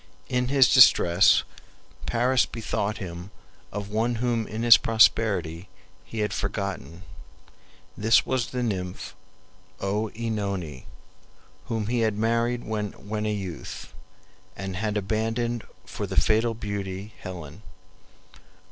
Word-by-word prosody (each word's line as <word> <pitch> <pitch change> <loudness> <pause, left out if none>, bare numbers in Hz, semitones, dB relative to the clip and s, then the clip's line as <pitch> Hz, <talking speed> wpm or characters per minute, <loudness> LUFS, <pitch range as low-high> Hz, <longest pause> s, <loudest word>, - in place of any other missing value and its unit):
In 125 0 0
his 135 -1 +5
distress 90 -8 +6 0.6
Paris 125 +2 +2
bethought 110 -2 -3
him 90 -2 -7 0.4
of 100 0 -5
one 115 +3 0
whom 115 -1 -1
in 110 +2 -4
his 120 -1 +10
prosperity 100 -7 +2 0.3
he 110 +2 -5
had 105 - -1
forgotten. 95 -4 -4 0.9
This 110 +2 +4
was 130 -3 0
the 125 -1 -3
nymph 95 -5 -4 0.7
OEnone, 100 - -3 0.8
whom 110 -2 -2
he 120 +2 0
had 110 -2 +1
married 115 +2 0
when 105 0 -4
a - - 0
youth, 95 -7 -6 0.6
and 95 0 -5
had 105 +1 -1
abandoned 115 +3 -1 0.2
for - - -5
the - - -5
fatal 115 +1 +2
beauty 100 -2 -5
Helen. 90 -1 -8
110 Hz, 110 wpm, -26 LUFS, 95-115 Hz, 0.9 s, his